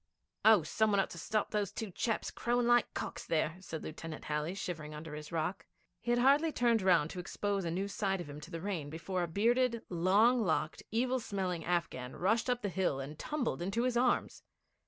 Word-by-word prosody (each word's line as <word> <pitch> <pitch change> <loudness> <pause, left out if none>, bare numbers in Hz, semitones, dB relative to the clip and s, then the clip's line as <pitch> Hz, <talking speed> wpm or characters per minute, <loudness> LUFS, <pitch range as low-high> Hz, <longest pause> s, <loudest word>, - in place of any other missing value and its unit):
'Oh, 215 -6 +7
some 220 +7 +1
one 200 -1 +3
ought 195 - 0
to 170 - -7
stop 210 +5 -1
those 205 -2 0
two 210 -1 -5
chaps 225 +5 -1
crowing 240 0 0
away 240 0 +7
like 240 - -3
cocks - - -4
there,' 160 0 0
said 160 -4 -6
Lieutenant 160 0 -7
Halley, 150 +4 -2
shivering 155 -6 -5
under 150 0 -7
his 150 0 -7
rock. 165 +3 -2 0.3
He - - -6
had 240 - +4
hardly 285 +6 +4
turned 235 -5 +2
round 170 -5 +4
to 180 - -6
expose 200 +1 -2
a - - -1
new 190 +4 -1
side 195 -1 -1
of 175 - -6
him 145 +1 -8
to 150 - -10
the 165 -2 -5
rain 175 -7 -3
before 180 +4 -3
a 175 - 0
bearded, 235 +6 +2
long 200 +8 +4
locked, 160 -3 0
evil 250 +3 +1
smelling 185 -6 -2
Afghan 150 -8 -2
rushed 220 +7 +1
up 245 -1 0
the 205 - 0
hill, 180 -7 0
and 140 +3 -7
tumbled 295 - -2
into 195 +7 0
his 250 -1 +1
arms. 245 +1 +1
190 Hz, 215 wpm, -33 LUFS, 165-230 Hz, 0.3 s, Oh